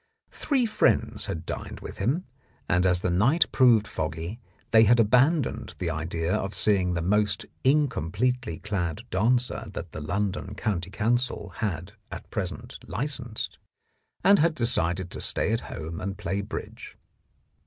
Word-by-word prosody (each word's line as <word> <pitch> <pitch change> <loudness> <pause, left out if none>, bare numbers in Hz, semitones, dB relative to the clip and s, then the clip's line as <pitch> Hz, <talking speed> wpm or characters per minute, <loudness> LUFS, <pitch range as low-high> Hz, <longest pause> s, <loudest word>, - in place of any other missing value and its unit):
Three 265 -5 +1
friends 215 -1 +1
had 80 0 -4
dined - - -6
with - - -8
him, 140 - 0 0.4
and 90 +1 +3
as 90 -1 +2
the 90 - 0
night 120 - +4
proved 115 -5 +5
foggy, 80 +4 -4 0.3
they 110 0 +7
had 120 +3 +5
abandoned 130 +7 +2
the 85 - -2
idea 80 +2 -2
of 95 +1 -2
seeing 95 -4 +2
the 85 - -1
most 100 +1 +1 0.2
incompletely 125 - +1
clad 95 0 -3
dancer 120 +4 +1
that 85 -1 -6
the 80 - -6
London 95 +4 -2
County 95 -5 -2
Council 110 +1 0
had 90 -3 -3 0.2
at - - -7
present - - -4
licensed, 120 0 -4 0.6
and 200 0 +6
had 165 0 +3
decided 90 - 0
to - - -4
stay 110 - +1
at 115 - +1
home 80 +1 -6
and 95 +1 -4
play 100 +1 -2
bridge. 100 - -7
105 Hz, 145 wpm, -27 LUFS, 90-125 Hz, 0.6 s, they